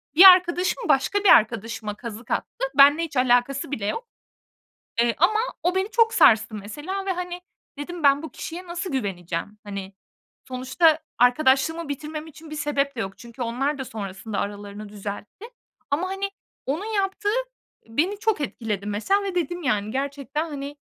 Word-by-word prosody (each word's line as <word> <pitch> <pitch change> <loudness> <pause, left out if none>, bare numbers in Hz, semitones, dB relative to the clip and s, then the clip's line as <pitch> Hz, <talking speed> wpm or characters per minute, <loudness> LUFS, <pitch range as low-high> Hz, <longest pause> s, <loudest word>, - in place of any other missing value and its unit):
bir 350 - +9
arkadaşım 365 +3 +6
başka 275 +9 +3
bir 400 - +5
arkadaşıma 220 -1 +3
kazık 230 +1 -8
attı. - - -2
Benimle 285 +4 +7
hiç 310 -4 -5
alakası 255 +2 +2
bile 220 -8 -3
yok. 460 - -3 0.9
Eee, 235 -1 +2
ama 415 +7 +3 0.2
o 360 +1 +1
beni 380 +3 0
çok 455 -1 +3
sarstı 220 -1 +5
mesela 295 - -5
ve, 390 - 0
hani, 360 0 -4 0.4
dedim, 330 +3 -6
"Ben 280 +1 +5
bu 320 - -5
kişiye 355 +2 -7
nasıl 350 +2 -4
güveneceğim?" 195 -5 -3
Hani, 200 -1 -6 0.5
sonuçta 265 +6 +2 0.2
arkadaşlığımı 270 +6 +3
bitirmem 305 +2 -5
için 315 +1 -13
bir 305 - -6
sebep 285 -2 -1
de - - -5
yok. 195 -1 -5
Çünkü 235 +1 -11
onlar 260 +5 -1
da 265 - -4
sonrasında 200 -1 -5
aralarını 205 +1 -5
düzeltti 205 - -7 0.5
ama, 340 +6 0
hani, 390 +1 -2 0.4
onun 310 +10 -2
yaptığı 410 -1 -1 0.6
beni 340 - 0
çok 435 -6 0
etkiledi 215 -7 -3
mesela 220 - +1
ve 390 -2 -4
dedim, 350 0 -2
"Yani, 210 -5 0
gerçekten, 280 +4 -3
hani, 285 0 -6
280 Hz, 160 wpm, -24 LUFS, 225-350 Hz, 0.9 s, bir